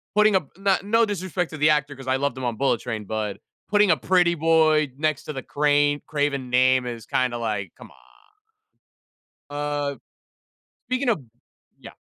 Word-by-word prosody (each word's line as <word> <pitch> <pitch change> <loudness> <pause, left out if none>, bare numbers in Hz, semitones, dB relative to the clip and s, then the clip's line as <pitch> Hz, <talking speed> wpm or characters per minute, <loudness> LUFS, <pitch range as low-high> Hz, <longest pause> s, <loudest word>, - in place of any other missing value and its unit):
putting 210 -1 +5
up 170 -7 0
n 195 0 +2
no 230 +3 +3
disrespect 185 -4 -3
to 155 - -7
the 150 +1 +3
actor 145 -1 0
'cause 135 0 -11
I 130 0 +2
loved 140 +1 -1
them 130 - -7
on 120 -2 -2
Bullet 135 -3 +1
Train, 110 -4 -5
but 105 -1 -3 0.3
putting 205 0 +4
a - - +5
pretty 175 +4 +2
boy 155 -2 +3
next 155 -1 -1
to 150 - -6
the 135 - -5
crane 145 +1 +1
Craven 145 -4 -2
name 130 0 +3
is 120 -3 -6
kinda 125 -2 0
like, 105 -4 -3
come - - -13
on. - - -20 1.6
Uh, 145 -1 -2 0.9
speaking 255 +1 -1
of 225 -9 +2 0.6
Yeah. - - -12
145 Hz, 175 wpm, -24 LUFS, 130-170 Hz, 1.6 s, putting